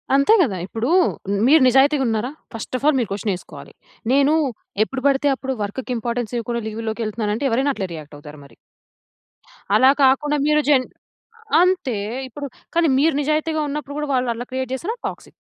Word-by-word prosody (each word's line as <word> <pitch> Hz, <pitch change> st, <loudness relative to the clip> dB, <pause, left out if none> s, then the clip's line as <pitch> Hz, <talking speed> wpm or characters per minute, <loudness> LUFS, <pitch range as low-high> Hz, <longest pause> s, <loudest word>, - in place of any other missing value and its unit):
అంతే 280 Hz, +10 st, +4 dB
కదా! 220 Hz, -, 0 dB
ఇప్పుడు 225 Hz, +5 st, -3 dB, 0.6 s
మీరు 305 Hz, +2 st, +6 dB
నిజాయితీగా 270 Hz, +3 st, +4 dB
ఉన్నారా? 225 Hz, +3 st, -1 dB, 0.2 s
ఫస్ట్ 225 Hz, +3 st, -6 dB
అఫ్ 270 Hz, -, -6 dB
ఆల్ 300 Hz, -, +4 dB
మీరు 230 Hz, -, -2 dB
క్వెషన్ 200 Hz, +1 st, -2 dB
వేసుకోవాలి. 160 Hz, -5 st, -10 dB, 0.4 s
నేను, 280 Hz, +2 st, +4 dB, 0.5 s
ఎప్పుడు 260 Hz, +4 st, -5 dB
పడితే 280 Hz, +1 st, +2 dB
అప్పుడు 265 Hz, 0 st, -4 dB
వర్క్‌కి 245 Hz, +6 st, -5 dB
ఇంపార్టెన్స్ 235 Hz, 0 st, -3 dB
ఇవ్వకుండా 235 Hz, 0 st, -3 dB
లీవ్ 220 Hz, +1 st, -5 dB
లోకెళ్తున్నాను 215 Hz, -1 st, -2 dB
అంటే, 280 Hz, -, -3 dB
ఎవరైనా 270 Hz, +5 st, +1 dB
అట్లే 190 Hz, -, -3 dB
రియాక్ట్ 150 Hz, -2 st, -9 dB
అవుతారు 150 Hz, 0 st, -12 dB
మరి. 140 Hz, -, -18 dB, 1.2 s
అలా 260 Hz, +1 st, +6 dB
కాకుండా, 290 Hz, +3 st, +3 dB
మీరు 300 Hz, 0 st, +3 dB
జెన్ 265 Hz, -3 st, +4 dB, 0.8 s
అంతే. 360 Hz, -9 st, +1 dB, 0.3 s
ఇప్పుడు, 280 Hz, +3 st, -7 dB, 0.3 s
కానీ 335 Hz, -1 st, +3 dB
మీరు 320 Hz, +2 st, +3 dB
నిజాయితీగా 310 Hz, +2 st, 0 dB
ఉన్నప్పుడు 285 Hz, 0 st, -5 dB
కూడా, 295 Hz, -, -3 dB
వాళ్ళు 250 Hz, -1 st, +1 dB
అలా 245 Hz, +2 st, -7 dB
క్రియేట్ 260 Hz, -1 st, -3 dB
చేసిన 340 Hz, -, -4 dB, 0.2 s
టాక్సిక్. -, -, -9 dB
260 Hz, 165 wpm, -21 LUFS, 225-285 Hz, 1.2 s, మీరు